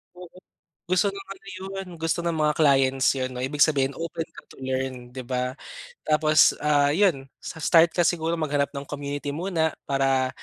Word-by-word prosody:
Oo. 180 Hz, 0 st, -10 dB, 0.6 s
Gusto 185 Hz, +3 st, +2 dB
ng 195 Hz, 0 st, -9 dB
ano 195 Hz, -, -22 dB
yun, 195 Hz, 0 st, -6 dB
gusto 165 Hz, +1 st, -1 dB
ng 170 Hz, -1 st, -1 dB
mga 150 Hz, -, +2 dB
clients 135 Hz, -2 st, +3 dB
yun 130 Hz, -1 st, -2 dB
'no, 125 Hz, -, -5 dB
ibig 140 Hz, +3 st, -3 dB
sabihin 135 Hz, -3 st, +1 dB
open 165 Hz, 0 st, -4 dB
ka -, -, -12 dB
to -, -, -18 dB
learn, 130 Hz, -1 st, -3 dB
'di 130 Hz, 0 st, -7 dB
ba? 125 Hz, +1 st, -2 dB, 0.5 s
Tapos, 155 Hz, 0 st, +5 dB
ah, 145 Hz, -1 st, +3 dB
yun. 170 Hz, -7 st, +2 dB, 0.2 s
Sa -, -, -7 dB
start 165 Hz, +2 st, +5 dB
ka 175 Hz, -, +1 dB
siguro 165 Hz, 0 st, 0 dB
maghanap 145 Hz, -3 st, 0 dB
ng 140 Hz, -1 st, -6 dB
community 145 Hz, 0 st, -4 dB
muna 165 Hz, -2 st, -1 dB, 0.2 s
para 135 Hz, -1 st, +2 dB
150 Hz, 180 wpm, -25 LUFS, 135-165 Hz, 0.6 s, Tapos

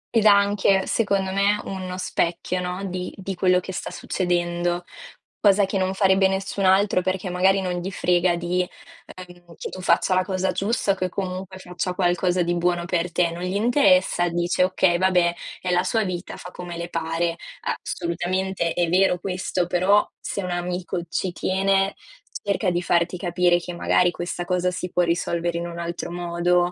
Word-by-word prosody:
Ed 220 Hz, -, +4 dB
anche, 200 Hz, -1 st, +4 dB
secondo 200 Hz, -4 st, 0 dB
me, 200 Hz, +2 st, +2 dB
uno 185 Hz, -1 st, -5 dB
specchio, 180 Hz, 0 st, -1 dB
no, 180 Hz, +2 st, -4 dB
di 180 Hz, -1 st, -4 dB
di 195 Hz, 0 st, -4 dB
quello 180 Hz, 0 st, +3 dB
che 190 Hz, +1 st, -7 dB
sta -, -, -4 dB
succedendo. 175 Hz, -1 st, -1 dB, 0.6 s
Cosa 200 Hz, -1 st, +4 dB
che 195 Hz, 0 st, -2 dB
non 190 Hz, +1 st, 0 dB
farebbe 190 Hz, -1 st, +4 dB
nessun 195 Hz, 0 st, -2 dB
altro, 190 Hz, 0 st, +4 dB
perché 185 Hz, 0 st, -2 dB
magari 190 Hz, +2 st, +3 dB
non 180 Hz, -1 st, -2 dB
gli 185 Hz, -, -4 dB
frega 175 Hz, -1 st, +2 dB
di, 175 Hz, +1 st, 0 dB
ehm, 175 Hz, -1 st, -12 dB
che -, -, -6 dB
tu 185 Hz, -, -8 dB
faccia 180 Hz, +2 st, +2 dB
la 185 Hz, -, +3 dB
cosa 185 Hz, 0 st, -1 dB
giusta, 205 Hz, 0 st, 0 dB
o -, -, +1 dB
che 185 Hz, -1 st, -2 dB
comunque 190 Hz, 0 st, -5 dB
faccia 180 Hz, 0 st, -4 dB
qualcosa 180 Hz, 0 st, +1 dB
di 175 Hz, +1 st, 0 dB
buono 175 Hz, 0 st, 0 dB
per 175 Hz, -1 st, -1 dB
te. 170 Hz, 0 st, +1 dB
Non 170 Hz, +1 st, -7 dB
gli 185 Hz, +2 st, -2 dB
interessa, 195 Hz, -7 st, +3 dB
dice: 175 Hz, +2 st, +1 dB
"Okay, 185 Hz, -1 st, +2 dB
vabbè, 180 Hz, -2 st, +3 dB, 0.3 s
è 180 Hz, -, -2 dB
la 180 Hz, 0 st, +3 dB
sua 220 Hz, +4 st, +1 dB
vita 180 Hz, -2 st, -5 dB
fa 180 Hz, -, -9 dB
come 175 Hz, -1 st, -7 dB
le 170 Hz, 0 st, -5 dB
pare." 165 Hz, 0 st, -1 dB, 0.5 s
Assolutamente 175 Hz, 0 st, -2 dB
è 175 Hz, -1 st, +1 dB
vero 185 Hz, +1 st, +3 dB
questo, 180 Hz, -1 st, -2 dB
però 185 Hz, +4 st, +3 dB
se 200 Hz, -, -4 dB
un 180 Hz, -, -3 dB
amico 175 Hz, 0 st, -3 dB
ci 185 Hz, -, -1 dB
tiene, 195 Hz, +2 st, +1 dB, 0.5 s
cerca 200 Hz, -2 st, +1 dB
di 175 Hz, 0 st, 0 dB
farti 175 Hz, +1 st, +1 dB
capire 175 Hz, -1 st, +2 dB
che 175 Hz, 0 st, -7 dB
magari 175 Hz, +1 st, +2 dB
questa 175 Hz, 0 st, -4 dB
cosa 180 Hz, 0 st, 0 dB
si 180 Hz, 0 st, -5 dB
può 180 Hz, -, +2 dB
risolvere 170 Hz, 0 st, -1 dB
in 170 Hz, -, -4 dB
un 170 Hz, 0 st, -7 dB
altro 170 Hz, 0 st, -4 dB
modo, 175 Hz, 0 st, +1 dB
180 Hz, 180 wpm, -23 LUFS, 175-190 Hz, 0.6 s, Ed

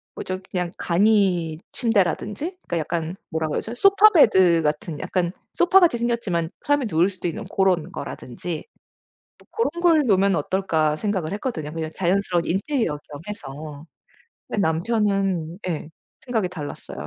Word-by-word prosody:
뭐죠 185 Hz, 0 st, -4 dB
그냥 180 Hz, -2 st, -2 dB
간이침대라든지 200 Hz, -, +1 dB
그러니까 170 Hz, -, -1 dB
약간 165 Hz, +2 st, -3 dB, 0.2 s
뭐라고 160 Hz, -1 st, -1 dB
해야하죠? 230 Hz, -, -4 dB
소파 395 Hz, -, +6 dB
베드 190 Hz, -, +5 dB
같은, 150 Hz, +1 st, -2 dB
약간 175 Hz, -2 st, -1 dB, 0.2 s
소파 355 Hz, +2 st, +5 dB
같이 340 Hz, -10 st, +4 dB
생겼지만 225 Hz, -9 st, -1 dB
사람이 290 Hz, -2 st, +1 dB
누울 170 Hz, +2 st, +3 dB
수도 185 Hz, -2 st, -5 dB
있는 215 Hz, +6 st, -4 dB
고런 185 Hz, -3 st, +1 dB
거라든지 155 Hz, 0 st, -6 dB, 0.7 s
또 -, -, -22 dB
'고런 460 Hz, -, 0 dB
걸 320 Hz, -5 st, +4 dB
놓으면 195 Hz, -3 st, +3 dB
어떨까?' 160 Hz, -2 st, +1 dB
생각을 190 Hz, -3 st, -2 dB
했거든요, 165 Hz, -, -4 dB
그냥 160 Hz, -1 st, -4 dB
자연스러운 180 Hz, -1 st, +1 dB
인테리어 195 Hz, -, 0 dB
겸 145 Hz, -1 st, -8 dB
해서. 150 Hz, -5 st, -8 dB, 0.6 s
근데 210 Hz, -, -1 dB
남편은 195 Hz, -1 st, 0 dB
예 155 Hz, -3 st, -3 dB, 0.4 s
생각이 225 Hz, -7 st, 0 dB
달랐어요. 145 Hz, -, -7 dB
185 Hz, 350 characters per minute, -23 LUFS, 160-220 Hz, 0.7 s, 소파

